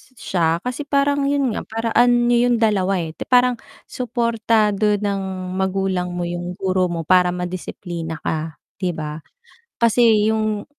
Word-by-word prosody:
siya 170 -7 0
kasi 250 +4 -3
parang 280 0 +1
yun 280 -4 +1
nga, - - -2
paraan 240 +2 +2
niyo 240 0 +3
yung 240 - +3
dalawa 195 -3 +2
eh. 160 -1 -5 0.2
Parang 250 -1 +4 0.3
suportado 225 -4 +1
ng 200 -1 -2 0.4
magulang 190 -1 -1
mo 175 - -3
yung 175 +1 -4
guro 185 0 0
mo 170 -1 -3
para 180 -1 +5
madisiplina 175 -2 -5
ka 155 0 -3 0.2
'di 180 -1 0
ba? 150 -1 -5 0.6
Kasi 225 -2 +4
yung 215 -1 -1
205 Hz, 140 wpm, -20 LUFS, 180-235 Hz, 0.6 s, para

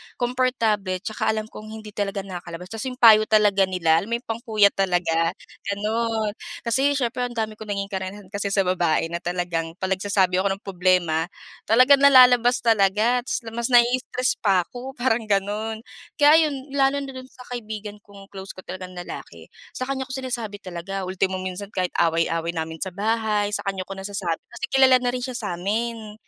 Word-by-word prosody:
komportable 230 -7 0
'tsaka 220 +1 -3
alam 215 0 -5
kong 215 - -10
hindi 215 -1 -9
talaga 200 -1 -3
nakakalabas. 180 -1 -8
Tas 225 +4 -4
yung 250 - -5
payo 220 -3 +7
talaga 205 -3 +4
nila, 165 -3 +2
alam 200 - -6
mo, 235 - -1
yung 235 - -6
pang 225 0 -2
kuya 210 -2 +5
talaga, 175 -3 0 0.3
gano'n. 215 +1 -1 0.3
Kasi, 270 +5 +2
siyempre, 250 -1 -1
ang 240 - -11
dami 220 -1 -3
kong 220 - -8
naging 200 -1 -3
karanasan 190 0 -6
kasi 200 -1 -2
sa 195 - +3
babae 170 -3 +1
na 170 - -2
talagang 175 -2 -3
'pag 190 +1 -4
nagsasabi 190 -2 +2
ako 195 - +1
ng 195 +1 -3
problema, 180 -4 +1 0.4
talagang 255 +5 +6
nalalabas 250 -3 +6
talaga. 220 +2 +3
Tas - - -2
mas 235 +1 -2
nai-stress 250 +1 +2
pa 190 -4 +3
ako, 255 +8 -9
parang 240 -3 0
gano'n. 205 +1 0 0.6
Kaya 300 +2 +8
ayon, 285 -4 0
lalo 275 0 +1
na 275 - -6
do'n 260 -1 -8
sa 255 - -17
kaibigan 215 -3 -6
kong 200 -1 -14
close 190 -1 -9
ko 185 - -11
talagang 185 0 -8
lalaki, 175 -1 -9 0.2
sa 255 +1 -5
kanya 265 -1 -2
ko 255 - -8
sinasabi 240 -6 -4
talaga. 185 +2 -5
Ultimo, 185 0 -1
minsan, 185 +2 -6
kahit 185 -1 0
away-away 165 0 +1
namin 160 -1 -4
sa 190 +2 -4
bahay, 210 0 0
sa 210 - -3
kanya 195 -1 -2
ko 195 +1 -8
nasasabi. 195 -4 -3 0.2
Kasi - - -4
kilala 260 -1 +5
na 245 - 0
rin 250 0 -3
siya 255 - -5
sa 205 -8 -4
amin. 220 +3 -3
210 Hz, 185 wpm, -23 LUFS, 185-240 Hz, 0.6 s, Kaya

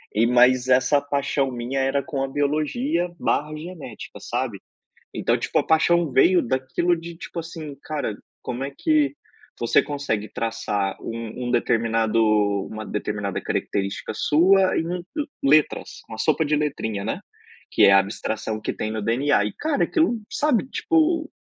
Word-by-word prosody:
E, 115 +2 +4
mas 125 +1 +4
essa 135 +3 +4
paixão 140 -1 -1
minha 125 +3 -3
era 135 +1 +1
com 140 -5 -3
a - - -1
biologia, 155 - 0
barra 150 +1 0
genética, 165 0 -9
sabe? - - -3 0.5
Então, - - +1
tipo - - -2
a - - -1
paixão 165 -1 +3
veio 175 +7 +5
daquilo, 130 +8 0
de 165 0 -9
tipo 170 - -6
assim: 160 -3 -7
"Cara, 145 -9 -3 0.3
como 125 +2 -4
é 140 - -4
que 305 -2 +2 0.4
você - - +4
consegue 140 -8 -3
traçar 110 -4 -2
um 115 +2 -5
um - - -1
determinado 115 -1 +1 0.5
uma 110 0 -7
determinada 105 -1 -3
característica 100 +2 -2
sua 185 +5 +4
em 165 - 0
u 175 0 -3 0.4
letras, 150 +2 +2
uma 110 - -7
sopa 155 +3 +2
de 150 - +2
letrinha", 110 -9 -2
né? 110 - -2 0.5
Que - - +6
é 100 - +7
a 100 - +8
abstração 110 +2 -3
que - - -2
tem 110 - -3
no 110 -1 -3
DNA. 115 0 +2
E, 105 - -4
cara, 305 -2 0
aquilo, 320 -9 +1
sabe, 285 -6 +1
tipo, 325 0 +1
140 Hz, 155 wpm, -23 LUFS, 115-165 Hz, 0.5 s, a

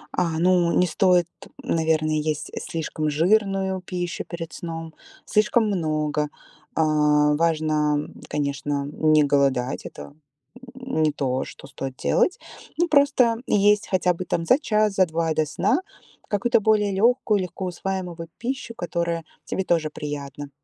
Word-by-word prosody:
А, 165 -3 0
ну 175 -1 +3
не 180 - +4
стоит, 180 0 +3 0.4
наверное, 160 -1 +1
есть 155 0 -2
слишком 155 -1 -3
жирную 190 +3 +1
пищу 175 -1 -4
перед 165 -2 -7
сном, 165 -1 -6 0.3
слишком 215 +2 +2
много. 155 -5 0 0.5
Э, - - +4 0.5
важно, 155 -2 +1
м, 145 - -5
конечно, 140 -1 -2
не 155 -1 +4
голодать. 140 -3 +1
Это - - -11 0.6
не 205 - 0
то, 130 -2 -1
что 135 - -12
стоит 135 -2 -6
делать. 365 - +1 0.4
Ну 345 +1 +1
просто 280 -6 +4
есть 205 0 +3
хотя 185 -2 +2
бы 185 - -5
там 165 -1 -1
за 255 - +5
час, 215 -7 +1
за 190 -1 +4
2 165 0 -1
до 155 0 +1
сна 155 - +1 0.5
какую-то 210 +4 +2
более 210 -1 +2
легкую, 215 +1 +2
легкоусваиваемую 180 0 -4
вот 165 0 -7
пищу, 245 0 -4
которая 170 -3 -2 0.2
тебе 190 - -2
тоже 165 -4 +1
приятна. 145 -1 -6
170 Hz, 135 wpm, -24 LUFS, 155-195 Hz, 0.6 s, за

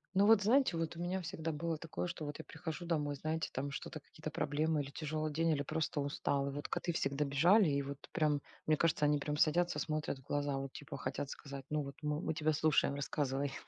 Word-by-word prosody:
Ну 200 +2 +6
вот, 220 -2 +7
знаете, 245 -3 +4
вот 165 0 -2
у - - -8
меня 185 +2 -1
всегда 165 -1 -3
было 165 +2 -1
такое, 165 +2 -4
что 170 -2 -5
вот 145 -1 -4
я - - -8
прихожу 175 0 -5
домой, 150 -4 0
знаете, 155 +3 -2
там 140 +2 -3
что-то, 155 +3 -5
какие-то 155 +1 -8
проблемы 150 +1 +1
или 140 - -8
тяжёлый 155 +1 -2
день, 165 +2 +2
или 145 -3 +2
просто 155 +1 -1
устала. 140 0 0
И - - -4
вот 145 +1 -4
коты 175 - -1
всегда 140 -1 0
бежали 170 +9 +5
и 140 0 +1
вот 140 0 -5
прям, 150 -2 +2 0.3
мне 155 0 +4
кажется, 155 -2 +3
они 150 0 +4
прям 150 +1 -2
садятся, 175 +3 +3
смотрят 155 -3 -2
в - - -18
глаза, 145 0 -1
вот 135 -1 -4
типа 145 - -7
хотят 140 - -3
сказать: 140 -2 -7
"Ну 150 0 +1
вот 140 -1 -6
мы, 150 +1 0
мы 160 - -1
тебя 155 -1 +2
слушаем, 150 -2 +3
рассказывай". 140 -1 -1
150 Hz, 230 wpm, -35 LUFS, 140-165 Hz, 0.3 s, вот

